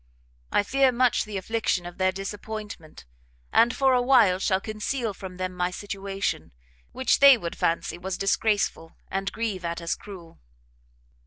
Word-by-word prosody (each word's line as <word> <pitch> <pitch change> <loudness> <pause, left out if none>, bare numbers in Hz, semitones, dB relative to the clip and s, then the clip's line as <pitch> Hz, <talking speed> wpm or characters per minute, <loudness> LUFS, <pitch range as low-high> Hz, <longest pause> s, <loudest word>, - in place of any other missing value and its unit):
I 205 - +3
fear 270 +4 +3
much 250 -1 +2
the 210 -2 -5
affliction 195 -2 -1
of 175 +1 -9
their 185 0 +3
disappointment, 200 - -7 0.5
and, 235 +1 +5
for 265 -1 +3
a 250 - +3
while, 235 -8 +4
shall 190 -1 +1
conceal 215 +2 -3
from 185 -1 -9
them 185 0 -3
my 180 0 -1
situation, 195 - -4 0.4
which 260 - +1
they 275 -2 +9
would 170 -6 -5
fancy 170 +1 -1
was 185 +1 -4
disgraceful, 195 -4 0 0.2
and 195 0 -2
grieve 215 -5 -3
at 170 0 -3
as 170 -1 -2
cruel." 180 -5 -11
195 Hz, 155 wpm, -26 LUFS, 180-225 Hz, 0.5 s, they